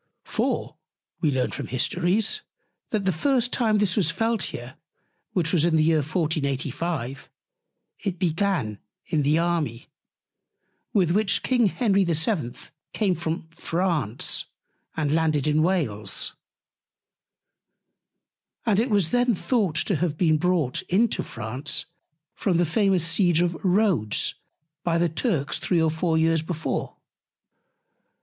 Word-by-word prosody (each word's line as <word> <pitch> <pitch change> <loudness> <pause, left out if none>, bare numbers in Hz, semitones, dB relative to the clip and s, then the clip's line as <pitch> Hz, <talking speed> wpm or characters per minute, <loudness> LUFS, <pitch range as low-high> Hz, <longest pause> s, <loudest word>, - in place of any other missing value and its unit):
For, - - -2 0.4
we 155 - +2
learn 130 -2 0
from - - -5
Histories, 180 - 0 0.5
that 215 -3 -1
the 190 - +3
first 245 - +1
time 220 -3 +2
this 205 -3 +1
was 190 -7 +2
felt 225 +4 0
here, 120 +2 -6 0.6
which 170 -2 +1
was 165 -4 +3
in 170 -1 +3
the 155 - +4
Year 160 0 +3
1485, 145 -3 -2 0.7
it 190 -3 -3
began 170 - 0 0.3
in 160 -4 0
the 145 +3 +3
Army, 165 -9 -1 1.0
with 180 -5 +2
which 205 +1 +2
King 245 -4 +3
Henry 200 -1 +2
VII. 165 - 0 0.4
came 200 -4 +1
from 165 -1 -3
France, 165 - 0 0.5
and 150 -2 0
landed 155 -3 +1
in 150 0 +2
Wales; 155 - 0 2.3
and 210 -2 +3
it 240 +4 +1
was 200 -7 +2
then 245 -2 +3
thought 200 - 0
to 185 +2 +1
have 160 -1 -1
been 155 -3 +3
brought 175 -7 +1
into 215 +5 +2
France 120 +5 -3 0.5
from 185 -5 0
the 175 - +3
famous 190 0 +2
Siege 175 -1 +3
of 175 -1 +1
Rhodes 185 - +2 0.5
by 170 -1 +1
the 170 0 +2
Turks 160 - -1
3 175 - +1
or 160 -1 +2
4 160 +1 0
Years 160 0 +3
before. 160 0 -3
170 Hz, 130 wpm, -25 LUFS, 155-195 Hz, 2.3 s, the